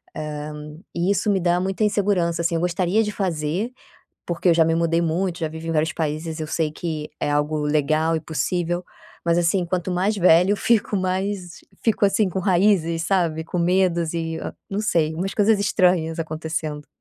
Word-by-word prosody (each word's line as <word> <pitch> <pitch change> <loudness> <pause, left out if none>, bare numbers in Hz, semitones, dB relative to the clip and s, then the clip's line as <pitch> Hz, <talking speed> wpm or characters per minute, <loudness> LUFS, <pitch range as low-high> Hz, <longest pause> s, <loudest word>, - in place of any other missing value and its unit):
hã, 150 0 -6 0.2
e 170 +2 0
isso 200 +1 0
me 195 - +2
dá 175 0 +2
muita 195 +3 -1
insegurança, 190 -5 +1
assim, 170 0 0
eu 165 - 0
gostaria 180 +4 +1
de 210 - -2
fazer, 180 +2 -2 0.6
porque 175 +1 0
eu - - +5
já 165 -1 +5
me 165 - +2
mudei 165 0 +2
muito, 170 +2 -1
já 160 - -1
vivi 160 +1 -7
em - - 0
vários 160 +1 +1
países, 160 +1 -3
eu 155 - -3
sei 155 0 -1
que 155 -1 -5
é 145 - 0
algo 150 +1 0
legal 155 +2 +1
e 160 - -2
possível, 175 +3 -2 0.4
mas 170 0 +2
assim, 175 +2 +2
quanto 180 +1 -2
mais 190 +4 0
velha 180 0 +5
eu 205 - +1
fico, 225 -2 +1
mais 185 -1 -2 0.2
fico 220 -2 +2
assim 200 0 +2
com 185 - -3
raízes, 180 -3 +2
sabe, 165 -4 +1
com 175 - -4
medos 175 -2 +1
e, 165 -1 -2
hã, - - -6 0.2
não 195 - -1
sei, 165 -7 +1
umas 190 +4 -3
coisas 210 0 +3
estranhas 180 -5 +2
acontecendo. 155 -1 -4
170 Hz, 190 wpm, -22 LUFS, 160-190 Hz, 0.6 s, eu